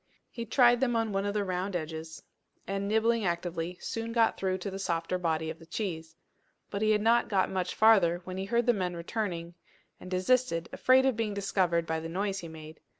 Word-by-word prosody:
He 235 -1 -6
tried 240 0 +5
them 245 -2 +1
on 225 -1 0
one 195 0 -1
of 205 - -2
the 210 - +1
round 185 0 -2
edges, 160 0 -5 0.4
and, 195 0 -2
nibbling 220 +2 +2
actively, 175 -1 -2
soon 230 0 -4
got 230 -1 +3
through 185 -1 -1
to 190 +2 -5
the 195 - -6
softer 170 -1 -1
body 160 -2 -1
of 160 - -11
the 165 - -13
cheese. 165 -4 -4 0.6
But 200 - -3
he 215 - +2
had 210 -1 +3
not 235 +2 +3
got 195 -3 +1
much 185 -1 -2
farther 195 -6 +5
when 185 +1 -6
he 190 - -3
heard 235 +3 +1
the 240 - +4
men 180 -4 -2
returning, 170 -1 -4 0.5
and 185 - -10
desisted, 185 -2 +1
afraid 260 +1 +4
of 265 -3 +2
being 215 -2 -2
discovered 180 -4 +1
by 160 0 -1
the 165 +1 -6
noise 195 +3 -2
he 170 - -7
made. 155 -1 -11
190 Hz, 210 wpm, -29 LUFS, 170-220 Hz, 0.6 s, tried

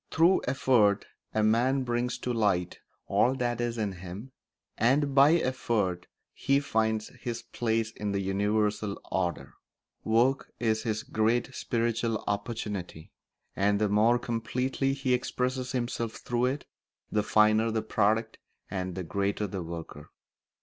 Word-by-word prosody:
Through 170 +4 +4
effort 120 -6 +3 0.3
a 110 - +1
man 125 +5 +3
brings 120 0 -1
to 125 - -3
light 100 -6 0 0.3
all 130 +2 +2
that 120 -2 -1
is 120 -1 -2
in 105 -3 -1
him, 95 +7 -8 0.4
and 135 +5 +2
by 140 +3 +7
effort 115 - 0 0.3
he 140 0 +2
finds 110 -5 0
his 120 -1 -4
place 115 -1 -1
in 105 -2 -4
the 100 - 0
universal 105 +1 0
order. 90 -3 -2 0.5
Work 120 +5 +2
is 110 -2 +1
his 110 -2 -2
great 115 +4 0
spiritual 115 -2 -1
opportunity, 100 -6 -4 0.4
and 100 +1 +2
the 105 -1 +2
more 110 +4 +4
completely 125 +3 -1
he 135 -2 0
expresses 125 0 -1
himself 120 -2 -2
through 120 -1 -1
it 135 +2 -3 0.5
the 105 - +2
finer 110 +2 +4
the 110 -1 -1
product 110 +1 +1 0.3
and 90 -2 -3
the 95 - -3
greater 100 +4 -1
the 95 -1 -4
worker. 85 -1 -8
110 Hz, 135 wpm, -29 LUFS, 105-125 Hz, 0.5 s, by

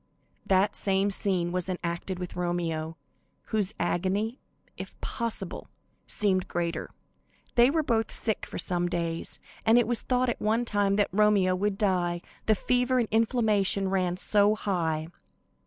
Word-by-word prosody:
The 190 +1 +4
same 195 0 +1
scene 185 -3 0
was 180 0 -2
enacted 175 +1 -3
with 180 -1 -6
Romeo, 165 -2 -2 0.5
whose 210 -3 0
agony, 200 +7 -1 0.4
if - - -9
possible, 230 -6 -4 0.4
seemed 190 -4 +1
greater. 170 -1 -2 0.6
They 240 +1 +6
were 315 +2 +1
both 230 -5 +1
sick 220 -2 -2
for - - -7
some 175 -1 0
days, 170 -1 -2 0.2
and 225 +1 +5
it 240 - +4
was 240 -1 +1
thought 255 0 +1
at 240 - -3
one 225 +3 +1
time 205 -3 +1
that 205 0 +2
Romeo 200 -2 +3
would 195 +2 -1
die, 175 -4 0 0.2
the 215 - +5
fever 250 +4 +1
and 235 -3 +2
inflammation 215 -4 +2
ran 180 -2 0
so 205 +2 +3
high. 165 -6 -1
195 Hz, 145 wpm, -28 LUFS, 175-220 Hz, 0.6 s, They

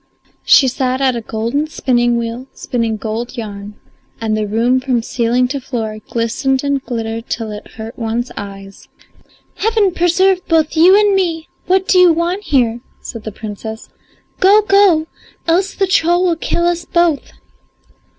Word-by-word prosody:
She 270 - +6
sat 255 0 -1
at 265 -2 +2
a 235 - -3
golden 230 +7 -2
spinning 240 -5 +1
wheel 235 +2 -4
spinning 230 -3 -2
gold 230 +4 -5
yarn, 205 -2 -7 0.4
and 220 -1 -1
the 215 -1 -1
room 235 +5 +1
from 255 -3 -1
ceiling 245 +1 0
to 280 0 -3
floor 225 -5 -4
glistened 260 +4 -1
and 280 -1 -1
glittered 225 -1 -5
till 225 -2 -3
it 210 0 -10
hurt 225 +2 -9
one's 230 +2 -2
eyes. 195 -1 -9 0.7
"Heaven 435 -3 +2
preserve 365 +2 +2
both 320 -1 +1
you 365 +5 +6
and 415 -1 +3
me, 335 -4 -1 0.2
what 375 +1 +2
do 370 - +4
you 360 -1 +7
want 350 +5 -2
here?" 240 -4 +1 0.2
said 230 -3 -9
the 215 - -4
Princess. 220 +1 -8 0.5
"Go, 410 +3 +5
go, 395 -6 +4 0.4
else 370 +4 +1
the 390 - +1
troll 350 -1 +2
will 345 -2 +2
kill 340 +1 -1
us 345 0 0
both." 340 -4 0
255 Hz, 160 wpm, -16 LUFS, 225-345 Hz, 0.7 s, you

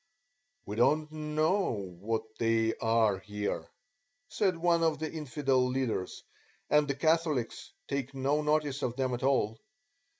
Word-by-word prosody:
"We 105 - -5
don't 150 +5 +3
know 155 - -1
that 110 -1 -3
they 115 -1 +2
are 115 -4 +2
here," 105 0 -4 0.6
said 190 -5 +1
one 170 0 +2
of 160 -2 +2
the 155 +1 -4
infidel 140 -4 0
leaders, 125 -7 -2 0.5
and 150 0 +5
the 140 - -1
Catholics 155 -4 0 0.2
take 140 -1 -3
no 140 +3 +1
notice 150 -2 0
of 120 -3 -1
them 130 -1 0
at 120 - -3
all. 130 -5 +1
135 Hz, 135 wpm, -30 LUFS, 115-155 Hz, 0.6 s, and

